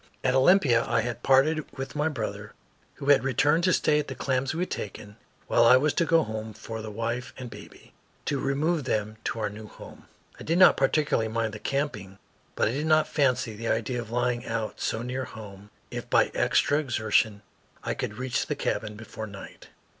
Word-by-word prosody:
At 125 - +2
Olympia 130 -4 +5
I 115 - +2
had 120 +1 -4
parted 150 +4 +3
with 135 +2 -6
my 150 +2 +1
brother, 150 - -5 0.4
who 140 - -4
had 145 - +6
returned 145 +5 +2
to 185 - +4
stay 150 -3 +3
at 150 - -3
the - - -6
claims 130 0 -1
we 165 - -3
had 180 - -2
taken, 105 0 -6 0.3
while - - +3
I 125 +2 +8
was 145 +3 +1
to 170 - +1
go 165 0 +4
home 110 -2 -5
for 110 +2 -7
the 110 - -6
wife 115 +4 -4
and 125 -3 -7
baby, - - -13 0.3
to 140 - -1
remove 145 +3 0
them 110 -2 -2
to - - -2
our 105 -1 -1
new 105 +1 -9
home. - - -13 0.3
I - - -8
did 165 +2 0
not 185 - +8
particularly 135 -4 +1
mind 110 -1 -2
the 105 - -7
camping, 105 -10 -3 0.4
but - - +2
I - - 0
did 145 +5 -2
not 155 0 +4
fancy 130 -6 +1
the 115 +2 -5
idea 120 +2 -1
of 115 - -10
lying 120 0 0
out 115 -2 -4
so 115 - -1
near 130 +1 -3
home 100 -2 -11 0.2
if - - -6
by - - +3
extra 145 - +2
exertion 110 -5 +1 0.4
I - - -1
could 105 - -4
reach 130 -1 -2
the - - -1
cabin 105 0 -2
before 110 0 -8
night. 100 -1 -11
125 Hz, 205 wpm, -27 LUFS, 110-145 Hz, 0.4 s, I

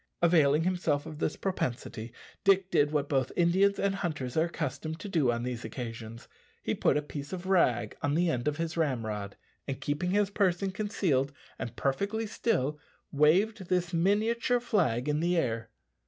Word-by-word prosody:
Availing 155 -3 +5
himself 170 -5 0
of 155 -1 -8
this 155 - 0
propensity, 120 - -3 0.3
Dick 195 -1 +4
did 150 -3 +4
what 145 -2 0
both 135 -3 0
Indians 190 +3 +3
and 200 0 +1
hunters 155 -10 -3
are 160 - +3
accustomed 155 0 -4
to 195 - -6
do 155 -10 +2
on 120 0 -2
these 125 -1 -4
occasions 115 -1 -7 0.4
he - - 0
put - - +2
a 150 - -1
piece 145 -1 -7
of 185 -1 -5
rag 125 - +2
on 145 +1 0
the 175 +2 +3
end 125 -6 -1
of 150 0 0
his 165 0 -2
ramrod, 110 -10 -2 0.3
and 135 -2 -3
keeping 145 +5 -1
his 205 +1 +2
person 195 -1 +1
concealed 185 -10 0 0.3
and 115 +1 -5
perfectly 200 - -1
still, 155 - 0 0.3
waved 185 +8 +3
this 180 -1 0
miniature 220 +7 +2
flag 160 - +1
in 150 0 +1
the 175 +2 +1
air. 115 -6 -1
160 Hz, 170 wpm, -30 LUFS, 130-190 Hz, 0.4 s, Availing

